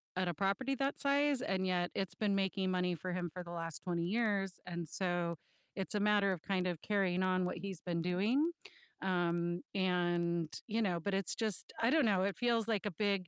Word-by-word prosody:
at 185 0 0
a 175 - 0
property 200 - 0
that 275 +2 0
size, 280 -1 +3
and 190 -1 0
yet 175 -1 +1
it's 185 -2 -2
been 210 -1 +1
making 190 -1 0
money 180 -1 +1
for 180 +3 -4
him 175 -1 -2
for 180 +2 -7
the 170 - -9
last 165 -2 -4
20 170 -2 -1
years, 200 -2 0
and 170 -3 -4
so 175 -3 -1 0.4
it's 195 0 -3
a 210 - +2
matter 205 -1 +4
of 175 - -6
kind 185 -1 0
of 175 -3 -3
carrying 190 -3 +1
on 185 0 +2
what 180 - -2
he's 190 -2 -5
been 170 -2 -1
doing, 210 - +2 0.5
um, 175 -2 0
and 175 -3 +1
you 225 0 0
know, 180 -5 +1
but 195 +5 -2
it's 195 -2 0
just 220 -4 -2
I 230 - +4
don't 315 0 +5
know, 195 -4 +3
it 200 0 0
feels 235 -2 +2
like 215 -2 0
a - - -2
big 195 0 0
185 Hz, 215 wpm, -35 LUFS, 175-205 Hz, 0.5 s, don't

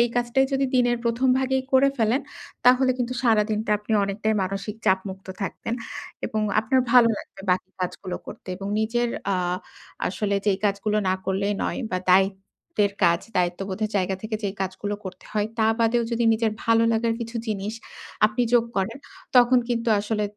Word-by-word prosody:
কাজটাই 245 +2 +2
যদি 270 0 +2
দিনের 245 -1 +3
১ম 235 +3 +1
ভাগেই 265 0 0
করে 270 +1 +6
ফেলেন 230 +4 +2 0.4
তাহলে 255 +1 +6
কিন্তু 250 0 -2
সারাদিনটা 215 -2 +2
আপনি 210 +2 -7
অনেকটাই 210 +2 -1
মানসিক 195 +3 -4
চাপমুক্ত 190 0 0
থাকতেন 200 +3 -3 0.5
এবং 215 - -2 0.2
আপনার 240 +4 +2
ভালো 240 -2 +7
লাগবে 195 - -11
বাকি 185 +1 0
কাজগুলো 180 0 -4
করতে 215 - -10
এবং 195 +1 -6
নিজের 240 +2 0 0.2
আ - - +1 0.7
আসলে 200 +1 -1
যেই 200 -2 +3
কাজগুলো 205 +1 0
না - - +3
করলেই 200 +2 0
নয় - - -2
বা 185 - +1
দায়িত্বের 195 - +1
কাজ, 170 -1 +4 0.2
দায়িত্ববোধের 190 +4 -1
জায়গা 190 -1 +1
থেকে 215 0 -3
যেই 200 0 -2
কাজগুলো 190 +2 -3
করতে 185 -1 -8
হয় 210 -1 +1
তা 220 - +4
বাদেও 230 +1 +3
যদি 235 0 +1
নিজের 220 0 +1
ভালো 230 0 +4
লাগার 230 0 +1
কিছু 230 +1 -6
জিনিস 210 0 -2 0.5
আপনি 215 +3 0
যোগ 240 -1 +6
করেন, 195 +6 -1 0.4
তখন 250 +1 +6
কিন্তু 235 -1 0
আসলে 210 +1 -1
215 Hz, 160 wpm, -24 LUFS, 195-235 Hz, 0.7 s, ভালো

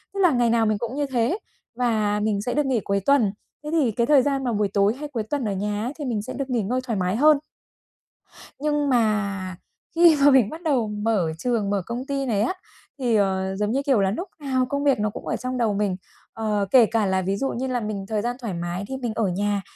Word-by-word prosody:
Thế - - -3
là 355 -3 +5
ngày 245 -3 +2
nào 230 -1 +3
mình 215 -1 +1
cũng 235 +4 -4
như 290 0 0
thế, 250 - +1 0.4
và 215 -4 +1
mình 210 -1 0
sẽ 245 +4 -2
được 295 0 +1
nghỉ 260 -3 +1
cuối 200 0 0
tuần. 270 -8 +4 0.3
Thế 300 - -5
thì 290 -8 +2
cái 235 +2 0
thời 290 -3 +6
gian 275 0 0
mà 245 -2 -1
buổi 210 -1 +1
tối 205 +2 +3
hay 300 - -5
cuối 235 -6 -3
tuần 265 +3 -3
ở 210 - -1
nhà 205 +2 -2
ấy 255 - -3
thì 295 - -3
mình 230 -5 -1
sẽ 255 +5 -7
được 275 -1 -4
nghỉ 240 -4 0
ngơi 245 +6 -1
thoải 230 -4 -2
mái 180 +2 0
hơn. 300 +4 +5 1.2
Nhưng 295 -1 0
mà 200 -6 0 0.4
khi 335 -2 +6
mà 285 +1 +7
mình 260 -6 +4
bắt 325 +2 -8
đầu 265 -9 +1
mở 210 -5 0
trường, 225 -2 -1
mở 200 -2 0
công 245 +3 -4
ty 275 -1 -2
này 215 -5 0
á, 235 - +1 0.4
thì, 245 -4 +1
ờ, 190 -1 0
giống 210 +1 -1
như, 275 +3 0
kiểu 265 -7 +3
là, 195 -1 +2
núc 350 - -4
nào 260 -3 0
công 280 +2 -2
việc 275 -4 +3
nó 210 0 0
cũng - - -9
ở - - -1
trong 255 0 -4
đầu 225 -4 +1
mình. 200 -2 0 0.4
Ờ, 210 -2 -1
kể 245 -2 +7
cả 220 -2 0
là 190 0 +1
ví 195 +2 -1
dụ 270 +6 -1
như 255 +3 -3
là 250 -2 -1
mình 210 -3 -4
thời 215 -2 -1
gian 240 +2 -2
thoải 225 -7 -4
mái 175 +2 -4
thì 265 - -4
mình 245 -4 -3
ở 225 - 0
nhà 200 +2 -1
230 Hz, 260 wpm, -24 LUFS, 205-265 Hz, 1.2 s, mà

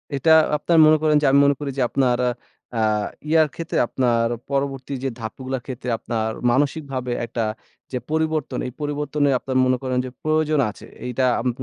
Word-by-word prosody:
এটা 160 +4 +2 0.3
আপনার 170 +1 +1
মনে 155 0 +6
করেন 155 -1 +3
যে - - +1
আমি 140 - +5
মনে 140 0 +3
করি 140 -2 -3
যে - - +1
আপনার 125 -3 +1 0.6
আ - - -2 0.5
ইয়ার 160 -1 +5
ক্ষেত্রে, 165 0 -3
আপনার 120 -3 +1 0.2
পরবর্তী 135 -1 -2
যে 135 - 0
ধাপগুলার 130 +3 -5
ক্ষেত্রে 130 -1 -6
আপনার 110 -1 -2 0.2
মানসিকভাবে 135 -2 -1
একটা 115 0 -4 0.5
যে 130 - -1
পরিবর্তন। 160 -2 -1
এই 125 - -7
পরিবর্তনে 145 0 0
আপনার 130 -1 -2
মনে 130 0 +2
করেন 130 -1 -1
যে - - -5
প্রয়োজন 155 -1 +1
আছে। 105 - -11 0.2
এইটা 125 +1 -1 0.2
আমি 125 +2 0
135 Hz, 170 wpm, -22 LUFS, 125-150 Hz, 0.6 s, মনে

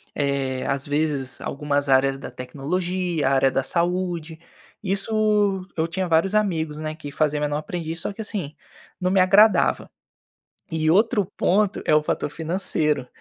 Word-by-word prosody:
eh, 140 -2 -1
às 140 0 -1
vezes 145 -3 0
algumas 145 0 -1
áreas 135 0 +3
da - - -8
tecnologia, 170 +4 -2
área 135 -1 +3
da 135 - 0
saúde. 170 0 -1 0.4
Isso, 200 -1 +1
eu 160 0 0
tinha 185 +2 -2
vários 170 +4 +2
amigos, 160 -8 0
né, 155 0 -4
que 145 -3 -9
faziam 150 0 0
menor 145 0 -1
aprendiz, 165 +1 -5
só 200 - -4
que 220 - -7
assim, 195 -9 -3 0.4
não 185 0 0
me 190 - +3
agradava. 205 +4 +4 0.8
E 155 -1 0
outro 210 +3 +3
ponto, 205 +2 +1
é - - +3
o 150 - +5
fator 150 - -2
financeiro. 155 -4 -1
160 Hz, 150 wpm, -23 LUFS, 145-185 Hz, 0.8 s, o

